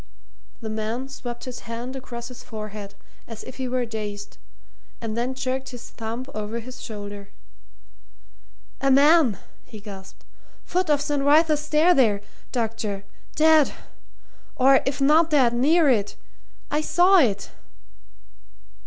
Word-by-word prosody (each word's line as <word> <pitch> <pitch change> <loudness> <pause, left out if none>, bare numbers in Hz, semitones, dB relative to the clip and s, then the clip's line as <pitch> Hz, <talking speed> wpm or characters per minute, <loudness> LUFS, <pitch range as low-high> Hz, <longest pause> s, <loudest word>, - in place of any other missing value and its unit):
The 220 - -5
man 220 +5 -3
swept 240 -3 -7
his 255 -1 -6
hand 240 +3 -5
across 240 -2 -7
his 250 -1 -11
forehead 215 -2 -8 0.3
as 225 -2 -8
if - - -10
he 260 -1 -3
were 250 0 -1
dazed, 210 -2 -6 0.6
and 225 -2 -4
then 245 +3 -2
jerked 260 0 -3
his 245 -2 -10
thumb 230 +2 -5
over 215 +2 -4
his 250 +2 -10
shoulder. 205 -2 -8 1.5
"A 275 - +2
man!" 280 - +5 0.3
he 220 - -11
gasped. 195 -2 -11 0.4
"Foot 365 -1 -1
of 290 -1 +3
St. 295 -1 -1
Wrytha's 300 +1 +4
Stair 305 +3 +4
there, 220 -9 +3 0.3
doctor. 225 -4 -2 0.3
Dead 315 -2 +5 0.8
or 270 -1 +5
if 275 0 -2
not 310 +4 +5
dead, 265 -6 +4
near 300 +7 +4
it. 215 -7 +1 0.6
I 300 +1 +1
saw 360 +4 +5
it!" 205 -9 +1
250 Hz, 135 wpm, -24 LUFS, 220-285 Hz, 1.5 s, man